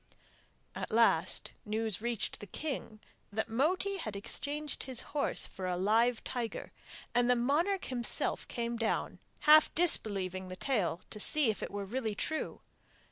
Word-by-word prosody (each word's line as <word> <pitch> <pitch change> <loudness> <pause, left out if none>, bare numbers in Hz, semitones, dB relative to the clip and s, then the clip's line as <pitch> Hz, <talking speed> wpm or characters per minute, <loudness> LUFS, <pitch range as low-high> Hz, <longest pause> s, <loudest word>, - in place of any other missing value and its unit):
At - - -5
last 230 +1 +2
news 220 -2 -1
reached 235 -2 -2
the 205 - -9
king 245 - -5 0.3
that 220 +2 -1
Moti 365 - +1
had 215 - -5
exchanged 290 +8 -2
his 255 -2 -2
horse 295 - +1
for 185 -1 -6
a 180 -1 -1
live 225 +5 +2
tiger; 240 -3 -4 0.4
and 245 0 +3
the 250 - +6
monarch 315 +11 +1
himself 245 -2 -1
came 235 -1 -3
down, 225 -1 -1 0.2
half 310 +1 +7
disbelieving 195 - +2
the 185 - -6
tale, 185 -7 0
to 210 - -7
see 280 +1 +4
if 215 - -7
it - - -3
were 200 0 -4
really 220 0 -2
true. 315 +9 -2
235 Hz, 150 wpm, -32 LUFS, 210-280 Hz, 0.4 s, half